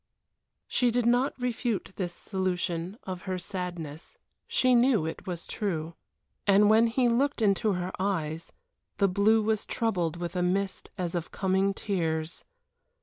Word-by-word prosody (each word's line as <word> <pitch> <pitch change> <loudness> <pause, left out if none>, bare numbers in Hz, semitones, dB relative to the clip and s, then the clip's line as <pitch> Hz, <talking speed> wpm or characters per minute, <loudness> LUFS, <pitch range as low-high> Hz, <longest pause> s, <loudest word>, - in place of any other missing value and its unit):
She 245 - +2
did 240 0 +1
not 245 +3 +2
refute 245 -4 -1
this 180 -3 -2
solution 180 0 -2
of 185 0 -6
her 185 - 0
sadness. 175 -4 -6 0.3
She 255 -1 +3
knew 240 -7 +4
it 160 - -6
was 175 -2 -4
true. 170 -6 -3 0.5
And 205 +1 +6
when 225 +2 +6
he 245 +2 +2
looked 265 +5 +2
into 210 0 +2
her 180 0 -2
eyes, 165 -5 -2 0.5
the 200 - +4
blue 210 +4 +3
was 220 -1 +1
troubled 180 -8 -1
with 175 +1 -5
a 180 - +1
mist 190 +2 -1
as 175 -3 -2
of 170 -2 -3
coming 195 +1 +1
tears. 165 -5 -2
190 Hz, 145 wpm, -28 LUFS, 175-220 Hz, 0.5 s, And